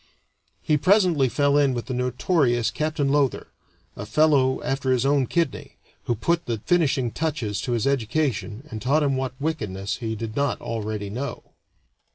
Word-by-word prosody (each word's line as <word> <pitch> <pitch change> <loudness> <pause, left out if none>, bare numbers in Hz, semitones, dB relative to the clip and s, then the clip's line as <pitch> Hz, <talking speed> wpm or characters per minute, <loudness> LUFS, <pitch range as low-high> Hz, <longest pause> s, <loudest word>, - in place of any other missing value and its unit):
He 150 - +2
presently 180 -6 +3
fell 145 +2 +2
in 140 -3 +2
with 120 - -4
the 130 - -4
notorious 125 0 +1
Captain 155 -2 -1
Lowther, 140 -3 0 0.4
a - - -6
fellow 135 0 +3
after 135 -1 -1
his 130 0 +2
own 140 -2 +2
kidney, 170 -6 -2 0.3
who 120 - 0
put 170 +10 0
the 115 -2 -1
finishing 145 -8 +2
touches 125 - -2
to 125 - -2
his 115 -3 0
education 135 -1 -1
and 110 -1 -6
taught 145 +7 +2
him 140 -2 +1
what 130 -1 -4
wickedness 100 -10 -3
he 110 -2 -3
did 110 0 -6
not 140 -2 0
already 105 -3 -4
know. 130 +6 -6
130 Hz, 165 wpm, -24 LUFS, 115-150 Hz, 0.4 s, presently